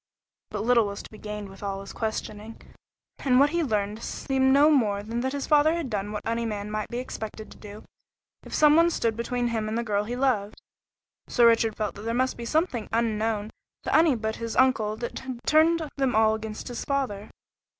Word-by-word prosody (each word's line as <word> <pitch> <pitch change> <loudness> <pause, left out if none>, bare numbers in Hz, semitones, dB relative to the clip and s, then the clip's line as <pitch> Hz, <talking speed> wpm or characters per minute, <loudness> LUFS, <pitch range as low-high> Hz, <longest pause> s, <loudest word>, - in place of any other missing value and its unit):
But 210 0 -4
little 235 -2 +4
was 200 0 -6
to - - -13
be 215 - -12
gained 210 -1 -6
with 195 0 -13
all 195 -1 -3
his 195 - -9
questioning, 215 0 -5 0.6
and 255 -2 +3
what 285 +1 +5
he 340 0 +1
could 295 - -2
learn 210 0 -1
seemed 265 +3 0
no 290 +3 +6
more 210 -8 +2
than 230 +3 -3
that 260 +2 -2
his 280 -1 -3
father 305 +1 +4
had 320 -8 -4
done 205 0 -2
what 210 -1 -5
any 230 +1 -1
man 210 -2 -4
might 215 0 -2
be 240 - -4
expected 220 -3 -6
to - - -13
do 210 0 -11 0.6
if - - -13
some 300 -1 +5
one 335 +1 +5
stood 230 -9 0
between 240 +1 -1
him 220 -2 -2
and 220 - -2
the 235 - -1
girl 205 -2 0
he 240 +3 -4
loved; 245 -6 0 0.7
so 240 - +3
Richard 230 -2 +4
felt 210 -2 -2
that 205 - -10
there 230 +2 -2
must 255 +1 +1
be 235 - -7
something 285 -4 0
unknown 220 -2 0 0.3
to - - 0
any 325 +1 +6
one - - -2
but 220 0 -2
his 230 -1 -4
uncle 220 -5 +2
that 235 +1 -5
had 260 -2 -6
turned 320 +1 +4
them 270 -4 +1
all 220 0 +4
against 220 0 -6
his 240 - -5
father. 255 -8 -2
230 Hz, 225 wpm, -26 LUFS, 215-260 Hz, 0.7 s, no